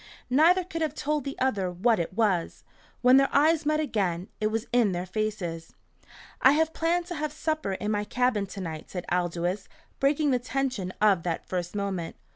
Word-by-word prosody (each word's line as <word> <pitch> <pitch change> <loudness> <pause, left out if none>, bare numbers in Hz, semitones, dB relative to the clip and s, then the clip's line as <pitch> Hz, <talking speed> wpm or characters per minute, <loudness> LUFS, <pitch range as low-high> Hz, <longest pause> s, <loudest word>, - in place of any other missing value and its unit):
Neither 335 +7 +5
could 330 -2 -6
have 305 -2 -1
told 300 -2 -1
the 275 - -5
other 205 -8 0
what 210 +5 +2
it 170 +2 -3
was. 200 -6 0 0.4
When 250 +1 +7
their 275 0 +4
eyes 305 +1 +3
met 305 0 +2
again, 195 - -1
it 215 - +1
was 220 +1 -2
in 230 -6 +3
their 175 +1 -3
faces. 185 -5 -4 0.7
"I 260 - +7
have 320 +1 +1
planned 340 +2 0
to 350 0 -6
have 300 0 -2
supper 310 -8 -2
in 210 +2 -2
my 205 -1 0
cabin 230 -3 0
to 195 +1 -7
night," 160 -3 -6
said 180 -2 -5
Aldous, 175 +2 -1 0.3
breaking 285 +1 +2
the 250 - +2
tension 250 -6 -2
of 200 -5 +5
that 165 -1 -3
first 175 0 -4
moment. 195 -5 -3
220 Hz, 190 wpm, -27 LUFS, 185-290 Hz, 0.7 s, When